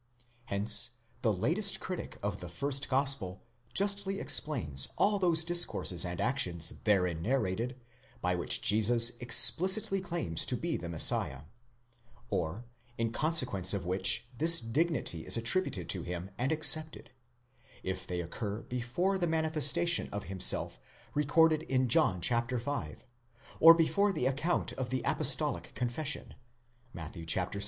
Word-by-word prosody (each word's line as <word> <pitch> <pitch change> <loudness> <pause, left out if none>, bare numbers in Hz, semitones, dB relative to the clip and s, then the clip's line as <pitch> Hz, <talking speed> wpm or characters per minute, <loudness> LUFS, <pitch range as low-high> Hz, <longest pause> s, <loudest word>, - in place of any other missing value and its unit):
Hence 105 +3 +1 0.3
the 110 - 0
latest 175 - 0
critic 185 - -8
of 100 -1 -4
the 90 -1 -9
first 140 +10 -3
gospel 135 -9 0 0.3
justly 200 0 -1
explains 80 - +1
all 205 0 +1
those 170 -3 +2
discourses 170 - +1
and 90 -1 -6
actions 90 - -2
therein 90 -6 0
narrated, 115 +2 -3 0.4
by 90 -5 -2
which 90 -1 +1
Jesus 115 +3 +5
explicitly 190 - +4
claims 170 - -2
to - - 0
be - - -4
the 85 - -7
Messiah, 75 -5 +3 0.9
or, 90 +8 -4 0.3
in 115 -1 -3
consequence 120 - +1
of 95 -4 -6
which 95 +5 +1
this 165 +5 +5
dignity 120 - -3
is - - +4
attributed 115 - 0
to - - 0
him 90 +2 -8
and 130 +7 -3
accepted, 155 -1 +2 0.7
if 95 -1 -6
they 90 -1 -4
occur 100 +5 -7
before 130 +11 -3
the 175 - -1
manifestation 160 +1 +1
of 100 0 -6
himself 95 -2 0 0.3
recorded 155 +2 +1
in 130 -4 -2
John 95 -5 +2
v., 120 - -2 0.6
or 165 +1 +8
before 200 +5 0
the 155 -9 -4
account 145 +7 -2
of 130 -2 -6
the 130 -2 -4
apostolic - - +3
confession 130 +5 -3 0.6
(Matt. 80 -7 -10
xvi.) 85 +4 -3
120 Hz, 130 wpm, -29 LUFS, -, 0.9 s, or